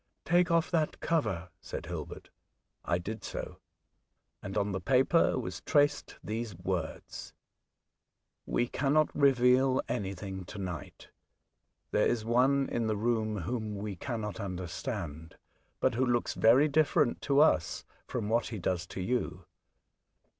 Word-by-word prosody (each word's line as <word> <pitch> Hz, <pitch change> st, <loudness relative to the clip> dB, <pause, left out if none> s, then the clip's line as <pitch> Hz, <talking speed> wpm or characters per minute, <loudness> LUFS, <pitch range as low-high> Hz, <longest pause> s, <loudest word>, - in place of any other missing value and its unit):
" -, -, -50 dB
Take 175 Hz, 0 st, +3 dB
off 165 Hz, 0 st, +2 dB
that 160 Hz, -3 st, 0 dB
cover," 110 Hz, -, -1 dB
said -, -, -6 dB
Hilbert. -, -, -7 dB, 0.5 s
I 85 Hz, -, +1 dB
did 105 Hz, +4 st, -6 dB
so, -, -, -6 dB, 0.8 s
and 95 Hz, +2 st, -5 dB
on 100 Hz, 0 st, +1 dB
the 95 Hz, -1 st, -3 dB
paper 135 Hz, -, +3 dB
was -, -, -4 dB
traced 145 Hz, -2 st, +1 dB
these 110 Hz, -1 st, -4 dB
word: 90 Hz, -3 st, -3 dB, 0.5 s
— -, -, -55 dB
*' -, -, -55 dB
We 120 Hz, -, +2 dB
cannot 145 Hz, +5 st, +1 dB
reveal 130 Hz, -1 st, +4 dB
anything 95 Hz, -1 st, -4 dB
to 100 Hz, -, -9 dB
night. 90 Hz, -3 st, -6 dB, 0.8 s
There -, -, +3 dB
is 115 Hz, -3 st, 0 dB
one 130 Hz, +4 st, +3 dB
in 115 Hz, -2 st, 0 dB
the 110 Hz, -1 st, 0 dB
room 110 Hz, -2 st, 0 dB
whom 110 Hz, +3 st, -3 dB
we 100 Hz, 0 st, -4 dB
cannot 110 Hz, 0 st, -4 dB
understand, 85 Hz, -4 st, -5 dB, 0.4 s
but 130 Hz, -, +2 dB
who 125 Hz, +3 st, +1 dB
looks 120 Hz, -2 st, +1 dB
very 125 Hz, +7 st, +5 dB
different 150 Hz, -2 st, +2 dB
to 140 Hz, -1 st, +2 dB
us 150 Hz, -, +3 dB, 0.2 s
from 115 Hz, -5 st, -3 dB
what 115 Hz, +2 st, +1 dB
he 115 Hz, -, -5 dB
Oxford, 90 Hz, -, -9 dB
33 -, -, +2 dB
does 85 Hz, -2 st, -4 dB
to 95 Hz, -, -6 dB
you. 90 Hz, -5 st, -2 dB
115 Hz, 150 wpm, -31 LUFS, 95-135 Hz, 0.8 s, very